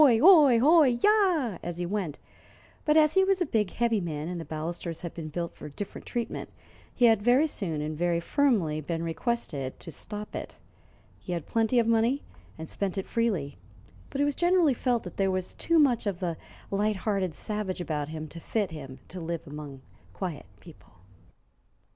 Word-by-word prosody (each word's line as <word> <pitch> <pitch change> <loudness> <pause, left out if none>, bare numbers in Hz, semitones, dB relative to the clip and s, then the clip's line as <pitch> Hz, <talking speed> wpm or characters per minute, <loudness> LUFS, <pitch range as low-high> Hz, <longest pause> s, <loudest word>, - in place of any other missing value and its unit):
ho! 290 0 +7
ho! 315 +7 +6
yah!" 300 - +3
as 175 -1 -5
he 175 - -2
went, 180 -5 -3 0.7
but 300 0 +4
as 305 -1 +5
he 380 - +5
was 385 -1 +2
a 355 - +2
big, 215 - 0
heavy 230 -1 +1
man, 155 -3 -4
and 175 -1 -4
the - - -5
balusters 165 +1 -4
had 170 - -5
been 160 -2 -6
built 170 +2 -4
for 150 - -9
different 200 +7 -7
treatment, 235 -1 -3 0.4
he 245 - +3
had 225 -3 +5
very 245 +7 +4
soon 175 - -3
and 155 +1 -3
very 175 -1 +2
firmly 185 - +1
been 165 +2 -3
requested 165 - -3
to 165 - -9
stop 210 +5 -7
it. - - -6 0.6
He 180 - -5
had 170 -3 -3
plenty 225 +2 +1
of 235 - +4
money, 230 +4 +2 0.3
and 160 0 -7
spent 195 +2 -3
it 195 - -2
freely; 190 - -1 0.5
but 275 - -5
it - - +4
was 290 - +1
generally 345 -2 +3
felt 245 -1 0
that 180 - -9
there 195 -1 +2
was 185 -1 -2
too 335 - +1
much 250 -8 +3
of 190 -4 -2
the 175 -3 -2 0.4
light 210 +2 +1
hearted 190 -4 -1
savage 210 -4 -3
about 150 -4 -3
him 155 0 -5
to 165 - -9
fit 200 +2 -1
him 135 -4 -8
to 180 - -7
live 165 0 -4
among 145 -2 -8 0.3
quiet 175 -6 -5
people. 165 -3 -16
195 Hz, 190 wpm, -28 LUFS, 165-245 Hz, 0.7 s, ho